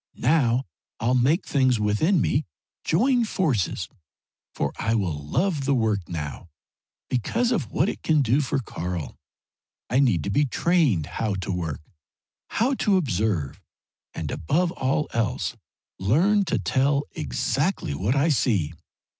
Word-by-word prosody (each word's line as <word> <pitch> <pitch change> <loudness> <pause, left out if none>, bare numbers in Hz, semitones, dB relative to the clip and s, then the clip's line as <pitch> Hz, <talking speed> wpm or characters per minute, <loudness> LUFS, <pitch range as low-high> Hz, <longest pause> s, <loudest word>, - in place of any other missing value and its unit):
Now 130 -2 +2 0.3
I'll 120 +3 +1
make 135 +9 +2
things 130 -4 +2
within 105 - +2
me 145 +4 0 0.4
join 240 +8 +3
forces, 155 - 0 0.7
for 70 - -1
I 115 0 +1
will 95 -7 0
love 140 - -1
the 140 -1 +2
work 110 -7 0
now, 75 -6 -5 0.6
because 230 - 0
of 155 - -1
what 150 - +1
it - - -4
can 155 -3 +3
do 130 +4 +2
for 135 -2 -1
Karl. 90 - -4 0.8
I 125 - +3
need 115 - +3
to 100 - -2
be 145 +8 +3
trained 140 - +2
how 105 +6 -2
to 95 0 -4
work, 80 -5 -3 0.7
how 250 +5 +1
to 200 -2 +3
observe, 105 - -1 0.5
and - - -4
above 170 - 0
all 150 -1 0
else 115 +2 -1 0.4
learn 180 - +3
to 140 - 0
tell 135 - +1
exactly 75 - -1
what 100 - 0
I 140 +4 +3
see. 100 - +1
125 Hz, 140 wpm, -25 LUFS, 95-155 Hz, 0.8 s, join